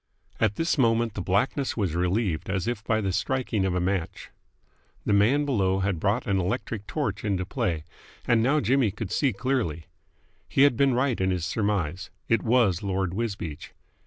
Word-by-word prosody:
At 110 Hz, -2 st, +2 dB
this 165 Hz, -2 st, 0 dB
moment 115 Hz, -2 st, +2 dB
the 100 Hz, -, -4 dB
blackness 110 Hz, +10 st, 0 dB
was 95 Hz, -7 st, 0 dB
relieved 90 Hz, 0 st, 0 dB
as 95 Hz, -2 st, -1 dB
if 120 Hz, -3 st, -2 dB
by 110 Hz, -1 st, +1 dB
the 95 Hz, -2 st, -1 dB
striking 105 Hz, +1 st, 0 dB
of 90 Hz, -2 st, 0 dB
a -, -, +1 dB
match. 95 Hz, +1 st, -2 dB, 0.7 s
The -, -, +2 dB
man 120 Hz, +9 st, +3 dB
below 95 Hz, -8 st, +1 dB
had 95 Hz, -3 st, -1 dB
brought 105 Hz, +7 st, 0 dB
an 100 Hz, -1 st, +1 dB
electric 100 Hz, +2 st, -3 dB
torch 110 Hz, -10 st, -2 dB
into 95 Hz, -3 st, -1 dB
play, 90 Hz, -, -2 dB, 0.4 s
and 120 Hz, -1 st, +3 dB
now 140 Hz, +6 st, +2 dB
Jimmy 125 Hz, +1 st, +2 dB
could 105 Hz, 0 st, -6 dB
see 135 Hz, +2 st, +2 dB
clearly. 110 Hz, -, -2 dB, 0.6 s
He 135 Hz, -, +4 dB
had 145 Hz, -3 st, +5 dB
been 135 Hz, 0 st, +3 dB
right 125 Hz, -4 st, +1 dB
in 95 Hz, -, +2 dB
his 90 Hz, -3 st, -1 dB
surmise. 95 Hz, -4 st, -1 dB, 0.2 s
It 115 Hz, -, +2 dB
was 115 Hz, -7 st, +2 dB
Lord 95 Hz, -2 st, -1 dB
Wisbeach. 100 Hz, -8 st, -4 dB
105 Hz, 180 wpm, -26 LUFS, 95-120 Hz, 0.7 s, had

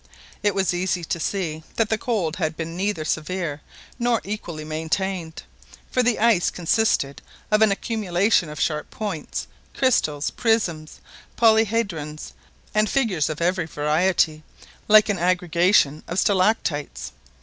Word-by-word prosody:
It 205 Hz, -2 st, +1 dB
was 190 Hz, -3 st, +1 dB
easy 180 Hz, 0 st, -1 dB
to 170 Hz, -, -3 dB
see 165 Hz, -3 st, -2 dB
that 225 Hz, -1 st, +1 dB
the 220 Hz, -, +1 dB
cold 190 Hz, -10 st, -1 dB
had 160 Hz, -3 st, -2 dB
been 165 Hz, 0 st, -5 dB
neither 190 Hz, -4 st, -2 dB
severe 160 Hz, -1 st, -2 dB, 0.4 s
nor 235 Hz, -1 st, +2 dB
equally 175 Hz, -6 st, -5 dB
maintained, 160 Hz, +2 st, -3 dB, 0.5 s
for 255 Hz, -, +2 dB
the 245 Hz, -1 st, +2 dB
ice 220 Hz, -6 st, +3 dB
consisted 175 Hz, -6 st, 0 dB, 0.3 s
of 210 Hz, 0 st, +4 dB
an 220 Hz, -2 st, +5 dB
accumulation 200 Hz, -4 st, +1 dB
of 150 Hz, -, -8 dB
sharp 150 Hz, -2 st, -1 dB
points, 200 Hz, -8 st, -4 dB, 0.3 s
crystals, 155 Hz, -, +1 dB
prisms, 180 Hz, -10 st, -1 dB, 0.4 s
polyhedrons, 215 Hz, -9 st, +1 dB, 0.4 s
and 215 Hz, 0 st, +2 dB
figures 215 Hz, -, +1 dB
of 155 Hz, +1 st, -5 dB
every 180 Hz, -1 st, 0 dB
variety, 155 Hz, +1 st, +1 dB, 0.5 s
like 215 Hz, 0 st, +7 dB
an 205 Hz, -4 st, -1 dB
aggregation 175 Hz, -3 st, +2 dB
of 175 Hz, -, -4 dB
stalactites. 185 Hz, -7 st, 0 dB
180 Hz, 130 wpm, -23 LUFS, 155-215 Hz, 0.5 s, like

